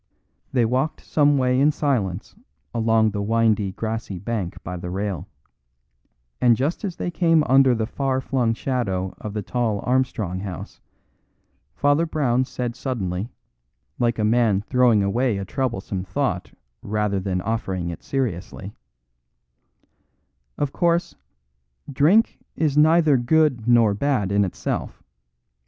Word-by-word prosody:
They 125 Hz, -3 st, +2 dB
walked 130 Hz, +6 st, -1 dB
some 145 Hz, -1 st, +3 dB
way 125 Hz, -1 st, +2 dB
in 145 Hz, +2 st, +4 dB
silence 115 Hz, -, -2 dB, 0.4 s
along 110 Hz, -1 st, +2 dB
the 100 Hz, 0 st, -3 dB
windy 110 Hz, -2 st, +1 dB
grassy 110 Hz, -3 st, -4 dB
bank 100 Hz, -2 st, -4 dB
by 90 Hz, -, -5 dB
the 90 Hz, 0 st, -6 dB
rail, 95 Hz, -2 st, -3 dB, 1.1 s
and 120 Hz, -2 st, +5 dB
just 145 Hz, +10 st, -1 dB
as 190 Hz, -4 st, -3 dB
they 175 Hz, -, -3 dB
came 165 Hz, -3 st, +3 dB
under 135 Hz, -1 st, +4 dB
the 110 Hz, -1 st, -1 dB
far 130 Hz, +2 st, -1 dB
flung 125 Hz, -4 st, 0 dB
shadow 95 Hz, -9 st, -2 dB
of 105 Hz, 0 st, -6 dB
the 105 Hz, -, -2 dB
tall 115 Hz, -2 st, -1 dB
Armstrong 125 Hz, -8 st, 0 dB
house, 95 Hz, -4 st, -7 dB, 0.9 s
Father 145 Hz, +4 st, +2 dB
Brown 130 Hz, -5 st, +1 dB
said 120 Hz, -2 st, -4 dB
suddenly, 100 Hz, -5 st, -3 dB, 0.7 s
like 120 Hz, -1 st, +1 dB
a 110 Hz, -, 0 dB
man 110 Hz, -3 st, +3 dB
throwing 120 Hz, -2 st, +3 dB
away 115 Hz, +3 st, +1 dB
a 100 Hz, -, -4 dB
troublesome 100 Hz, -6 st, -3 dB
thought 95 Hz, 0 st, -2 dB, 0.3 s
rather 105 Hz, -1 st, -1 dB
than 95 Hz, -1 st, -2 dB
offering 95 Hz, -4 st, -2 dB
it 85 Hz, -, -8 dB
seriously: 100 Hz, -6 st, -4 dB, 1.8 s
"Of 145 Hz, -2 st, -2 dB
course, 170 Hz, 0 st, +1 dB, 0.8 s
drink 170 Hz, -, +3 dB, 0.2 s
is 150 Hz, -3 st, 0 dB
neither 155 Hz, -1 st, +5 dB
good 130 Hz, -2 st, +2 dB
nor 115 Hz, -4 st, +5 dB
bad 105 Hz, -3 st, 0 dB
in 100 Hz, 0 st, +3 dB
itself. 90 Hz, -, -4 dB
115 Hz, 130 wpm, -23 LUFS, 100-135 Hz, 1.8 s, and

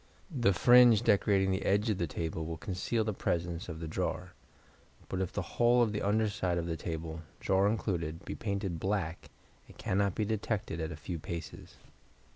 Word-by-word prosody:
The 120 Hz, -6 st, +3 dB
fringe 120 Hz, +4 st, +6 dB
decorating 100 Hz, -1 st, +3 dB
the 95 Hz, -, -1 dB
edge 105 Hz, +3 st, +2 dB
of 100 Hz, -, -2 dB
the 85 Hz, -, 0 dB
table 80 Hz, +1 st, -3 dB
will 80 Hz, 0 st, -4 dB
conceal 95 Hz, +7 st, -1 dB
the 110 Hz, 0 st, -2 dB
presence 85 Hz, -1 st, -2 dB
of 80 Hz, -1 st, -6 dB
the 80 Hz, -, -5 dB
drawer; 80 Hz, -, -3 dB, 0.8 s
but 95 Hz, -, -2 dB
if 95 Hz, -, -2 dB
the -, -, -2 dB, 0.2 s
whole 120 Hz, +1 st, +6 dB
of 110 Hz, -, 0 dB
the 105 Hz, -, -2 dB
under 110 Hz, +2 st, +2 dB
side 95 Hz, -4 st, -1 dB
of 85 Hz, -, -1 dB
the 85 Hz, -1 st, -2 dB
table, 80 Hz, 0 st, -5 dB, 0.2 s
drawer 95 Hz, +1 st, +3 dB
included, 85 Hz, -7 st, -2 dB
be -, -, -4 dB
painted 100 Hz, -5 st, -3 dB
black, 95 Hz, -3 st, -2 dB, 0.4 s
it -, -, -15 dB
cannot 100 Hz, 0 st, 0 dB
be 110 Hz, -, 0 dB
detected 105 Hz, -5 st, -2 dB
at 80 Hz, +1 st, -3 dB
a -, -, -5 dB
few 80 Hz, +3 st, -5 dB
paces. 85 Hz, +2 st, -7 dB
95 Hz, 190 wpm, -31 LUFS, 85-105 Hz, 0.8 s, fringe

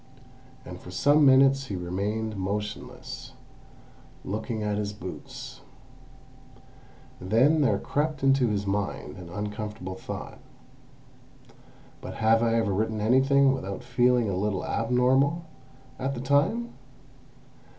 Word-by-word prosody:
And 90 Hz, 0 st, -8 dB
for 90 Hz, -, -12 dB
some 145 Hz, +10 st, +4 dB
minutes 135 Hz, 0 st, +5 dB
he 100 Hz, -, -4 dB
remained 100 Hz, +5 st, -3 dB
motionless, 100 Hz, +2 st, -5 dB, 0.9 s
looking 110 Hz, +2 st, -3 dB
at 105 Hz, 0 st, -1 dB
his 105 Hz, -1 st, -3 dB
boots. 95 Hz, -3 st, -9 dB, 1.6 s
Then 125 Hz, -, +3 dB
there 140 Hz, -, +3 dB
crept 150 Hz, -1 st, -2 dB
into 135 Hz, -2 st, +4 dB
his 100 Hz, -2 st, -1 dB
mind 100 Hz, 0 st, -3 dB
an 90 Hz, -2 st, -10 dB
uncomfortable 105 Hz, 0 st, -5 dB
thought. 95 Hz, -, -7 dB, 1.6 s
"But -, -, -7 dB
have 115 Hz, 0 st, +3 dB
I 115 Hz, -1 st, +2 dB
ever 110 Hz, -4 st, +1 dB
written 110 Hz, +2 st, -1 dB
anything 135 Hz, +4 st, +4 dB
without 100 Hz, -7 st, -5 dB
feeling 125 Hz, -1 st, +2 dB
a 100 Hz, -, -1 dB
little 95 Hz, 0 st, -1 dB
abnormal, 130 Hz, +7 st, +2 dB, 0.5 s
at 135 Hz, +1 st, -2 dB
the 120 Hz, -, -5 dB
time? 150 Hz, -, +1 dB
110 Hz, 115 wpm, -27 LUFS, 100-135 Hz, 1.6 s, minutes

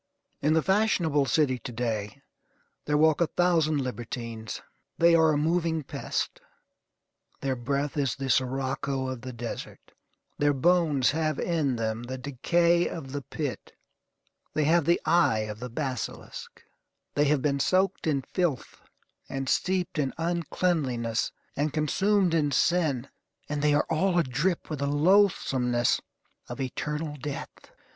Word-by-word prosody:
In 150 Hz, +2 st, +3 dB
the 160 Hz, -1 st, +3 dB
fashionable 180 Hz, -8 st, +2 dB
city 130 Hz, 0 st, +2 dB
to 125 Hz, -, -7 dB
day 115 Hz, +2 st, -3 dB, 0.6 s
there 150 Hz, 0 st, +1 dB
walk 155 Hz, +1 st, +4 dB
a 170 Hz, -, +4 dB
thousand 160 Hz, -5 st, +2 dB
libertines. 115 Hz, -2 st, -5 dB, 0.3 s
They 170 Hz, 0 st, +5 dB
are 160 Hz, -1 st, +5 dB
a 150 Hz, -, +1 dB
moving 160 Hz, 0 st, +1 dB
pest. -, -, -3 dB, 1.0 s
Their 135 Hz, -1 st, 0 dB
breath 140 Hz, +3 st, -2 dB
is 140 Hz, -4 st, +1 dB
the 135 Hz, -, -4 dB
sirocco 130 Hz, +1 st, 0 dB
of 130 Hz, -2 st, -5 dB
the 130 Hz, 0 st, -6 dB
desert. 120 Hz, -1 st, -7 dB, 0.5 s
Their 145 Hz, 0 st, +3 dB
bones 150 Hz, -2 st, +3 dB
have 155 Hz, -1 st, -1 dB
in 155 Hz, -7 st, 0 dB
them 110 Hz, 0 st, -2 dB
the 130 Hz, +2 st, -5 dB
decay 170 Hz, +6 st, +2 dB
of 135 Hz, -6 st, -7 dB
the 145 Hz, +1 st, -3 dB
pit. 125 Hz, -, -5 dB, 0.8 s
They 155 Hz, -, +2 dB
have 165 Hz, +1 st, +3 dB
the 170 Hz, +2 st, +3 dB
eye 155 Hz, -9 st, +3 dB
of 110 Hz, +1 st, -6 dB
a 125 Hz, -, -5 dB
basilisk. 130 Hz, -1 st, -5 dB, 0.5 s
They 145 Hz, -, +2 dB
have 145 Hz, -2 st, +2 dB
been 140 Hz, -1 st, +1 dB
soaked 185 Hz, +4 st, +1 dB
in 140 Hz, -4 st, +1 dB
filth, 170 Hz, -7 st, -2 dB, 0.5 s
and 135 Hz, 0 st, -3 dB
steeped 180 Hz, +1 st, 0 dB
in 135 Hz, -3 st, -1 dB
uncleanliness, 160 Hz, -8 st, 0 dB, 0.2 s
and 145 Hz, +2 st, 0 dB
consumed 185 Hz, +5 st, +2 dB
in 150 Hz, -3 st, +2 dB
sin, 145 Hz, -3 st, +1 dB, 0.4 s
and 145 Hz, -1 st, -2 dB
they 150 Hz, 0 st, +3 dB
are 145 Hz, -, +2 dB
all 175 Hz, +3 st, +1 dB
adrip 165 Hz, +4 st, 0 dB
with 155 Hz, -3 st, -4 dB
the 140 Hz, -, 0 dB
loathsomeness 145 Hz, -7 st, +3 dB, 0.5 s
of 120 Hz, -, -6 dB
eternal 150 Hz, +3 st, -3 dB
death. 140 Hz, +1 st, -7 dB
145 Hz, 140 wpm, -27 LUFS, 130-165 Hz, 1.0 s, They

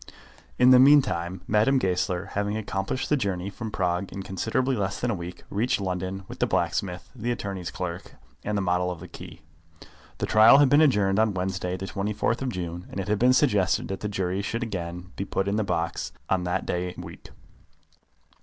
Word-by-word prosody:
In 125 Hz, +1 st, +6 dB
the 130 Hz, -, +8 dB
meantime 125 Hz, -11 st, +4 dB
Madame 110 Hz, +6 st, +3 dB
Goesler, 95 Hz, -3 st, -1 dB
having 105 Hz, +1 st, -1 dB
accomplished 100 Hz, +3 st, -3 dB
the 150 Hz, -, +3 dB
journey 100 Hz, -6 st, -2 dB
from 110 Hz, +2 st, -6 dB
Prague 90 Hz, -2 st, -1 dB
in 95 Hz, -, -6 dB
considerably 120 Hz, +8 st, -1 dB
less 100 Hz, -2 st, -2 dB
than 120 Hz, -, 0 dB
a -, -, 0 dB
week, 90 Hz, -2 st, -7 dB
reached 110 Hz, +4 st, +1 dB
London 95 Hz, 0 st, -3 dB
with -, -, -9 dB
the -, -, +2 dB
blacksmith, 90 Hz, -2 st, -1 dB
the 120 Hz, 0 st, -3 dB
attorney's 100 Hz, -7 st, -3 dB
clerk, -, -, -6 dB, 0.3 s
and 105 Hz, 0 st, -1 dB
the 100 Hz, -, 0 dB
model 90 Hz, 0 st, +1 dB
of 90 Hz, -2 st, -5 dB
the 90 Hz, -, -9 dB
key. -, -, -11 dB, 0.8 s
The -, -, -1 dB
trial 110 Hz, +5 st, +7 dB
had 145 Hz, -2 st, +5 dB
been 145 Hz, +3 st, +6 dB
adjourned 105 Hz, -9 st, +3 dB
on 110 Hz, -3 st, +2 dB
Wednesday, 90 Hz, 0 st, -2 dB
the 95 Hz, -, -5 dB
24th 105 Hz, +5 st, -1 dB
of 135 Hz, -, -1 dB
June, 90 Hz, -4 st, -5 dB
and -, -, -6 dB
it 95 Hz, -, -4 dB
had 105 Hz, -1 st, +1 dB
been 125 Hz, +1 st, +5 dB
suggested 105 Hz, -10 st, +2 dB
that 95 Hz, -, -3 dB
the 105 Hz, -, -3 dB
jury 95 Hz, -1 st, -1 dB
should 115 Hz, +4 st, -3 dB
be -, -, -1 dB
again 90 Hz, -1 st, -5 dB, 0.2 s
put 95 Hz, -, -1 dB
into 100 Hz, +1 st, 0 dB
their 110 Hz, -, 0 dB
box 85 Hz, -3 st, -2 dB, 0.2 s
on 90 Hz, -2 st, +1 dB
that 90 Hz, -, -1 dB
day 90 Hz, 0 st, -2 dB
week. -, -, -10 dB
100 Hz, 200 wpm, -26 LUFS, 90-110 Hz, 0.8 s, the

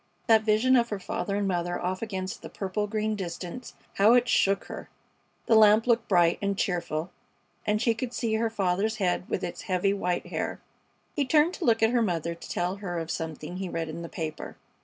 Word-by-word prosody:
That 225 Hz, -2 st, +5 dB
vision 220 Hz, +4 st, +3 dB
of 235 Hz, -1 st, +3 dB
her 205 Hz, -, -2 dB
father 195 Hz, +1 st, -3 dB
and 200 Hz, -1 st, 0 dB
mother 175 Hz, -1 st, -1 dB
off 185 Hz, +1 st, -2 dB
against 190 Hz, -4 st, -4 dB
the -, -, -8 dB
purple 210 Hz, +2 st, -3 dB
green 215 Hz, 0 st, -1 dB
distance, 185 Hz, +4 st, -6 dB, 0.2 s
how 210 Hz, +4 st, +6 dB
it 245 Hz, 0 st, +3 dB
shook 195 Hz, -4 st, +2 dB
her! -, -, -8 dB, 0.6 s
The -, -, +2 dB
lamp 215 Hz, 0 st, +6 dB
looked 235 Hz, -2 st, +2 dB
bright 175 Hz, -3 st, +3 dB
and 200 Hz, -1 st, -1 dB
cheerful, 170 Hz, -3 st, -2 dB, 0.6 s
and 210 Hz, 0 st, +2 dB
she 230 Hz, 0 st, +2 dB
could 235 Hz, +2 st, -4 dB
see 230 Hz, -2 st, -2 dB
her 225 Hz, +1 st, +1 dB
father's 200 Hz, +1 st, 0 dB
head 180 Hz, -3 st, -1 dB
with 185 Hz, -, -2 dB
its 175 Hz, -, -4 dB
heavy 185 Hz, +2 st, +2 dB
white 180 Hz, -3 st, -1 dB
hair. -, -, -3 dB, 0.6 s
He 290 Hz, -, +2 dB
turned 300 Hz, +5 st, +3 dB
to 360 Hz, -, -4 dB
look 225 Hz, -2 st, +3 dB
at 225 Hz, -, +4 dB
her 245 Hz, -1 st, +2 dB
mother 170 Hz, -5 st, -1 dB
to 170 Hz, -, -12 dB
tell 180 Hz, +2 st, -1 dB
her 180 Hz, -4 st, -4 dB
of 165 Hz, 0 st, -3 dB
something 160 Hz, +1 st, -5 dB
he 190 Hz, -1 st, -4 dB
read 165 Hz, -2 st, -3 dB
in 165 Hz, +2 st, -6 dB
the 170 Hz, -, -7 dB
paper. 155 Hz, -2 st, -6 dB
200 Hz, 210 wpm, -27 LUFS, 175-225 Hz, 0.6 s, how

